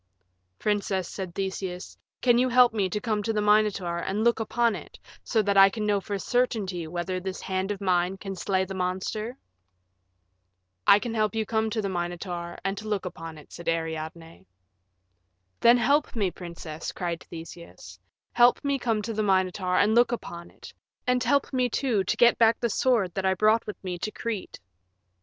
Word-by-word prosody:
"Princess," 200 -3 -1
said 185 -3 -6
Theseus, 190 -2 -4 0.3
"can 240 -1 +5
you 255 +1 +2
help 245 -1 +5
me 200 -4 0
to 210 - -2
come 215 -2 -1
to 225 - -1
the 215 - 0
Minotaur 210 -4 +2
and 200 +5 -2
look 235 0 +3
upon 230 0 +1
it - - -10 0.3
so 220 -3 +1
that 200 0 +1
I 195 0 +9
can 210 +1 -4
know 205 -1 +1
for 200 +1 -3
certainty 195 -6 -1
whether 175 +2 -3
this 185 +1 -5
hand 190 +1 -2
of 205 -2 -3
mine 185 -1 +1
can 195 0 -6
slay 190 +1 0
the 195 - -7
monster?" 190 +6 -3 1.5
"I 200 - +9
can 230 +2 -4
help 215 -2 0
you 220 - +1
to - - -17
come 220 0 +1
to 220 -1 -2
the - - 0
Minotaur 175 -1 -4
and 195 +1 -2
look 210 -3 -2
upon 165 -3 -7
it," 150 - -15
said 170 - -4
Ariadne. 165 0 -4 1.1
"Then 235 +1 +6
help 280 +5 +2
me, 200 -5 0
princess," 170 -3 -7
cried 170 -1 -4
Theseus; 160 - -10 0.3
"help 245 +3 +4
me 280 -1 +1
to - - -12
come 225 -3 +1
to 225 - -3
the 215 - -1
Minotaur 185 -2 +1
and 215 - +4
look 240 +1 +4
upon 170 -7 -6
it, - - -13 0.3
and 250 -1 +2
help 280 +3 +1
me, 250 -1 +2
too, 230 -5 0
to - - -1
get 240 0 +5
back 230 0 +4
the 235 -2 0
sword 220 -9 +1
that 190 -1 -2
I 190 - +2
brought 215 +4 +3
with 210 - -5
me 180 -2 -4
to 215 - -2
Crete." 215 -3 -5
200 Hz, 190 wpm, -26 LUFS, 180-225 Hz, 1.5 s, I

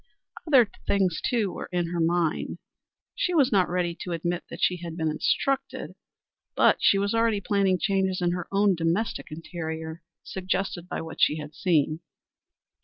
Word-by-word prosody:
Other 260 -7 +6 0.2
things, 190 -5 +1
too, 220 -6 +1
were - - -7
in 175 -2 0
her 175 - -2
mind. 165 -1 0 0.6
She 380 -8 -1
was 280 -4 +4
not 190 -4 +3
ready 175 -1 -1
to 180 - -4
admit 175 +1 -2
that 170 - -8
she 180 - +3
had 170 -1 -7
been 160 -2 0
instructed, 270 - -1 0.6
but - - +5
she 195 - +5
was 200 +2 0
already 225 -2 +2
planning 200 -2 +2
changes 190 -1 0
in 175 -1 +1
her 175 -1 -3
own 200 0 +4
domestic 170 +6 -1
interior, 160 0 -6 0.2
suggested 190 -1 -3
by - - -3
what 160 0 -7
she 150 - +4
had 150 0 -7
seen. 155 -3 +1
180 Hz, 165 wpm, -26 LUFS, 165-200 Hz, 0.6 s, Other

